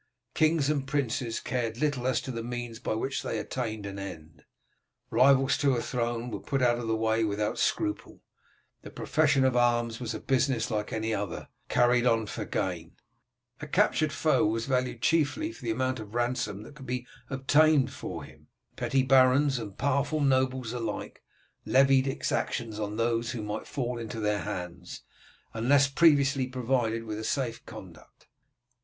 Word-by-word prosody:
Kings 155 -2 +2
and 145 -2 0
princes 125 -4 -1
cared 115 -3 -2
little 140 -3 0
as 130 - +1
to 130 - -5
the 115 -2 -4
means 120 -1 -5
by 115 - -2
which 135 +5 -2
they - - -3
attained 110 -5 -4
an 100 0 -6
end. 80 -5 -9 0.7
Rivals 135 +3 +4
to 140 -3 +3
a 120 - -1
throne 120 -1 -2
were - - -4
put 135 - -2
out 120 -1 +3
of 120 - -4
the 110 - +1
way 110 0 +1
without 105 0 -1
scruple; 105 - -2 0.6
the - - -10
profession 145 -1 +2
of 130 -1 +2
arms 120 -1 +2
was 115 -3 -4
a - - -4
business 130 -3 0
like 105 -1 -2
any 110 0 -1
other, 100 -3 -4 0.2
carried 120 0 +3
on 115 -2 +2
for - - -5
gain; 85 -3 -3 0.7
a - - -6
captured - - +2
foe - - +2
was 115 +2 0
valued 125 -3 -1
chiefly 165 - +1
for - - -14
the 115 - -3
amount 130 +2 -1
of 105 +1 -9
ransom 120 -4 -1
that 130 - -12
could 135 -3 -12
be 125 0 -3 0.2
obtained 140 +1 +3
for - - -6
him; - - -15 0.3
petty 135 -1 +1
barons 135 +1 +4
and 100 -4 -8
powerful 140 +3 0
nobles 130 -3 +1
alike 120 -2 -5 0.4
levied 135 0 +4
exactions 115 -4 -2
on 105 0 -3
those 115 +1 0
who 115 -3 -4
might 105 +1 -5
fall 125 -4 -3
into 115 0 -6
their 105 -1 0
hands, 90 -2 -6 0.5
unless 135 +5 +4
previously 140 -3 +3
provided 120 -3 -1
with 110 -1 -5
a - - -5
safe 115 -1 -2
conduct. - - -13
120 Hz, 170 wpm, -28 LUFS, 110-135 Hz, 0.7 s, Rivals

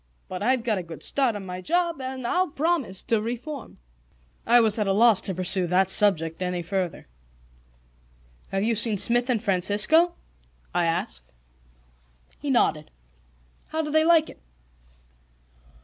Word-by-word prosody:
But 185 0 -7
I've 250 +2 +1
got 220 -5 0
a - - -4
good 165 -2 -10
start 265 -5 +1
on 200 -2 -7
my 180 0 -7
job, 340 - -1
and 260 -1 -6
I'll 365 +9 +1
promise 295 - -2
to 225 -2 0
reform." 245 +5 -7 0.7
I 240 +1 +6
was 220 -1 +2
at 210 - 0
a 195 - +2
loss 225 0 +4
to 190 - -4
pursue 185 0 +2
that 185 +2 +2
subject 165 -6 +2
any 180 -1 -3
further. 185 0 -4 1.4
"Have 195 0 -2
you 230 +2 +1
seen 225 -1 +2
Smith 240 +5 +2
and 235 -3 0
Francisco?" 210 - +3 0.6
I 175 - +1
asked. 115 - -3 1.1
He - - -5
nodded. - - +1 0.8
"How 320 0 -3
do 300 - -5
they 315 +1 +3
like 325 -1 +4
it?" - - -13
215 Hz, 150 wpm, -24 LUFS, 185-265 Hz, 1.4 s, I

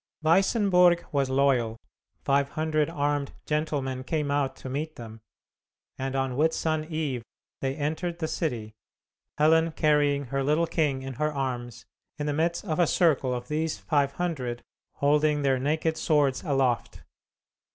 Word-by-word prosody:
Weissenburg 180 0 +4
was 140 -3 +1
loyal, 130 -4 +2 0.5
five 140 0 +2
hundred 155 -1 0
armed 145 -3 -1
gentlemen 145 -4 -2
came 150 +1 -1
out 140 -2 0
to - - -9
meet 150 +4 -4
them, 115 -1 -10 0.7
and 135 0 -4
on 135 -1 -1
Whitsun 155 +1 +1
Eve 150 -6 -2 0.4
they 135 0 -2
entered 160 +4 -2
the 160 -2 -2
city, 120 -11 -3 0.6
Helen 160 +2 +4
carrying 145 -2 +2
her 135 0 +1
little 150 +4 +2
king 150 -5 0
in 135 0 -5
her 150 0 +2
arms 125 -5 -4 0.3
in 145 - -3
the 145 - 0
midst 170 +5 0
of 160 -4 -2
a 175 - +4
circle 150 -8 +2
of 125 0 -4
these 155 +2 -1
five 140 -3 0
hundred 135 -9 -3 0.3
holding 150 +1 +2
their 135 -2 +2
naked 160 +4 0
swords 145 -4 +2
aloft. 135 -6 0
145 Hz, 145 wpm, -27 LUFS, 135-160 Hz, 0.7 s, Weissenburg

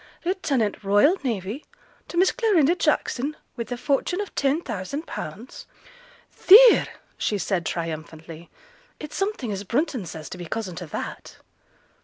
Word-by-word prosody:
lieutenant 275 - -1
Royal 205 - +4
Navy, 225 +1 -3 0.4
to 345 - -7
Miss 370 +2 +4
Clarinda 375 - +3
Jackson, 290 -4 0 0.2
with 235 -1 -6
a 245 - -2
fortune 285 +8 0
of 410 - -5
10,000_l_.' 270 - -4 0.7
'Theere!' 455 +5 +8 0.3
said 190 -4 -1
she, - - 0
triumphantly, 165 0 -7 0.5
'it's 300 -1 -8
something 390 - -2
as 200 0 -4
Brunton 250 - -1
says, 160 -2 -8
to 180 - -8
be 175 - -6
cousin 190 -2 -4
to 175 - -6
that.' - - -7
240 Hz, 130 wpm, -24 LUFS, -, 0.7 s, Theere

